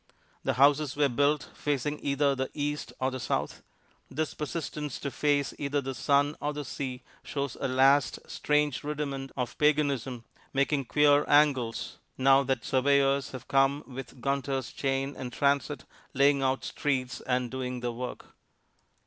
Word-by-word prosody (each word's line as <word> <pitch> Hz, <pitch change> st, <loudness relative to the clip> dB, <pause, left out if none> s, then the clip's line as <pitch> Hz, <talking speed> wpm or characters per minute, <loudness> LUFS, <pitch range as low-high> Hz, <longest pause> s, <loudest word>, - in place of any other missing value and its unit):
The 135 Hz, -, +1 dB
houses 140 Hz, +2 st, +4 dB
were 145 Hz, -1 st, +3 dB
built 145 Hz, +4 st, +1 dB
facing 145 Hz, +1 st, -2 dB
either 140 Hz, 0 st, +2 dB
the 130 Hz, 0 st, -2 dB
east 145 Hz, 0 st, -3 dB
or 130 Hz, +1 st, 0 dB
the 130 Hz, -, -5 dB
south. 120 Hz, -, -2 dB, 0.5 s
This 155 Hz, +3 st, -2 dB
persistence 150 Hz, -2 st, -4 dB
to 140 Hz, -, -4 dB
face 145 Hz, -1 st, +1 dB
either 145 Hz, 0 st, 0 dB
the 135 Hz, -1 st, -4 dB
sun 140 Hz, +4 st, +2 dB
or 150 Hz, 0 st, -1 dB
the 150 Hz, -1 st, -5 dB
sea 130 Hz, -2 st, -5 dB, 0.2 s
shows 140 Hz, -3 st, -4 dB
a -, -, +1 dB
last, 135 Hz, +2 st, +4 dB
strange 150 Hz, -2 st, 0 dB
rudiment 140 Hz, -2 st, -4 dB
of 125 Hz, -3 st, -2 dB
paganism, 140 Hz, -5 st, +1 dB, 0.3 s
making 140 Hz, 0 st, +1 dB
queer 145 Hz, +3 st, +4 dB
angles 140 Hz, -6 st, +2 dB, 0.2 s
now 135 Hz, +1 st, +5 dB
that 130 Hz, -3 st, -1 dB
surveyors 140 Hz, +1 st, +2 dB
have 130 Hz, -, -9 dB
come 135 Hz, +2 st, +2 dB
with 130 Hz, 0 st, -9 dB
Gunter's 135 Hz, -1 st, -1 dB
chain 135 Hz, 0 st, -1 dB
and 125 Hz, -2 st, -6 dB
transit, 140 Hz, +1 st, 0 dB, 0.3 s
laying 140 Hz, +1 st, +4 dB
out 130 Hz, 0 st, 0 dB
streets 130 Hz, -4 st, -2 dB
and 125 Hz, -1 st, 0 dB
doing 125 Hz, -1 st, -4 dB
their 120 Hz, 0 st, -1 dB
work. 125 Hz, +1 st, -6 dB
140 Hz, 150 wpm, -29 LUFS, 130-145 Hz, 0.5 s, now